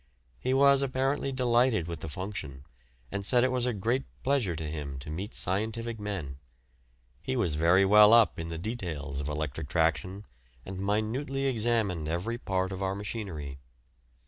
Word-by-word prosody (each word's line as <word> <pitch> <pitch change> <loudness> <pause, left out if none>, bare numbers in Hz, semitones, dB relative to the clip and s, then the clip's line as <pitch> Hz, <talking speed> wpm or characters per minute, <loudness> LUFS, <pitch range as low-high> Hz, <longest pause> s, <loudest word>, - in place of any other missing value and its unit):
He 130 - -1
was 140 +1 +5
apparently 135 +1 0
delighted 120 -6 +2
with 85 -1 -5
the 80 - -6
function, 75 -7 -6 0.5
and 100 - -3
said 120 +4 +3
it 130 - +2
was 125 -1 +1
a - - +2
great 115 +5 0 0.2
pleasure 130 -11 +1
to 80 - -5
him 75 -3 -5
to 65 +3 -7
meet 95 +8 -4
scientific 110 +4 -2
men. 90 -10 -5 0.8
He 130 - -2
was 100 -11 +1
very 85 +5 +4
well 105 +2 +8
up 115 -6 +5
in 85 0 -4
the 80 - -4
details 80 - -4
of 70 0 -3
electric 75 -2 -4
traction, 90 +5 0 0.4
and 95 0 -6
minutely 110 +8 -1
examined 110 - +1
every 90 +9 -2
part 95 -2 -1
of 95 0 -5
our 95 0 -1
machinery. 95 -10 -5
100 Hz, 165 wpm, -29 LUFS, 80-120 Hz, 0.8 s, well